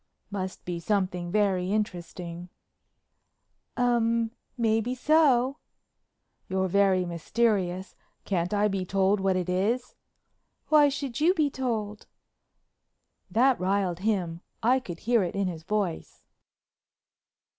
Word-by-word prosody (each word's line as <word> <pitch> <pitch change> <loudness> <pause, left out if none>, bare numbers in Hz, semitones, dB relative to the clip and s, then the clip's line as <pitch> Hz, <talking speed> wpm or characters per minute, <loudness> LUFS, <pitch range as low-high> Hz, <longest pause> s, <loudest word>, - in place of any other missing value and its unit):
"Must 190 -2 -5
be 175 -1 -3
something 180 -2 -1
very 195 -3 +1
interesting." 175 -4 -4 1.3
"Um—maybe 230 -1 0
so." 275 -2 +3 0.9
"You're 190 0 0
very 190 -1 +3
mysterious—can't 185 -1 -2
I 210 0 +2
be 195 -2 -2
told 195 +2 +2
what 190 -1 +1
it 180 -1 -1
is?" 210 +8 0 0.8
"Why 300 -2 +6
should 275 -3 -4
you 350 +4 +4
be 300 -4 +1
told?" 220 -6 -3 1.2
That 255 +2 +3
riled 185 -1 0
him, 185 -5 -1 0.2
I 250 +3 +4
could 175 -9 -8
hear 235 -1 +3
it 180 0 -2
in 200 -1 0
his 165 -3 -5
voice. 195 -1 -3
200 Hz, 105 wpm, -27 LUFS, 185-235 Hz, 1.3 s, Why